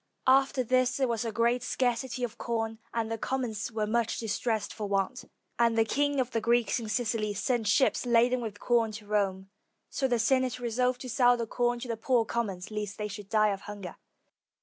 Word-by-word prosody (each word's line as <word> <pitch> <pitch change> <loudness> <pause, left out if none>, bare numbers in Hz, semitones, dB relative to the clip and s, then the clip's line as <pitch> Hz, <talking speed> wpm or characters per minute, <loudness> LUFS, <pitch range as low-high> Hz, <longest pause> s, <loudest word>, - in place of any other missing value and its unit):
After 270 0 +4
this 255 +1 +2
there 265 -1 +2
was 235 -1 -1
a 225 - -2
great 235 +3 +1
scarcity 250 0 -1
of 240 - -4
com, 225 -1 -2
and 225 -1 -2
the 225 - -3
commons 245 -4 -2
were 220 -1 -1
much 230 +1 0
distressed 220 -1 -2
for 210 -2 -4
want, 200 +5 -1 0.3
and 230 -1 +3
the 225 - +4
king 285 +4 +1
of 250 -1 0
the 225 - -1
Greeks 235 0 +2
in 225 -2 -6
Sicily 215 -2 -1
sent 235 +1 0
ships 260 +6 +3
laden 240 +1 +3
with 215 -3 -6
com 235 -2 +2
to 210 0 -8
Rome: 195 -2 -1 0.4
so 265 - 0
the 245 -2 +1
Senate 255 +2 +2
resolved 250 +1 0
to 255 - -6
sell 245 +1 +4
the 230 - -2
corn 240 +1 0
to 255 - -5
the 230 -1 -3
poor 235 0 +2
com 235 0 -1
mons, 185 0 -7
lest 210 -2 -4
they 210 - -3
should 205 -1 -8
die 215 -1 +3
of 195 -1 -3
hunger. 200 -4 -8
230 Hz, 210 wpm, -29 LUFS, 215-245 Hz, 0.4 s, After